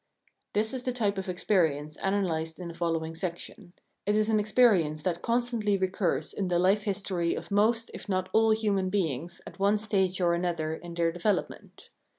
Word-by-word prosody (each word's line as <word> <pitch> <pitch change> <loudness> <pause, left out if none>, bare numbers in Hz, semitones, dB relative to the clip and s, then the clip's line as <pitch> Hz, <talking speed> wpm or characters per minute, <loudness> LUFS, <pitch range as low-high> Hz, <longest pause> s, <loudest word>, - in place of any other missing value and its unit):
This 215 +4 +1
is 260 - -3
the 250 0 -2
type 205 -5 0
of 190 - -5
experience 160 -5 0
analysed 170 -5 -1
in 180 -2 -6
the - - -7
following 165 -1 -2
section. 175 +1 -6 0.3
It 205 - +3
is 215 +1 +2
an 215 -1 +3
experience 205 -9 +3
that 175 -1 -1
constantly 235 -4 +1
recurs 190 -1 -1
in 195 - -2
the 175 -1 +1
life 195 +4 +3
history 190 -4 -1
of - - -7
most 225 +3 +2
if - - -9
not 185 -1 0
all 225 0 +4
human 205 -4 +1
beings 170 -4 -2
at 175 - -11
one 200 +2 +3
stage 195 -3 0
or 175 -2 +3
another 170 -3 -1
in 170 +1 -8
their 170 -1 +1
development. 175 +5 -3
190 Hz, 180 wpm, -28 LUFS, 170-210 Hz, 0.3 s, all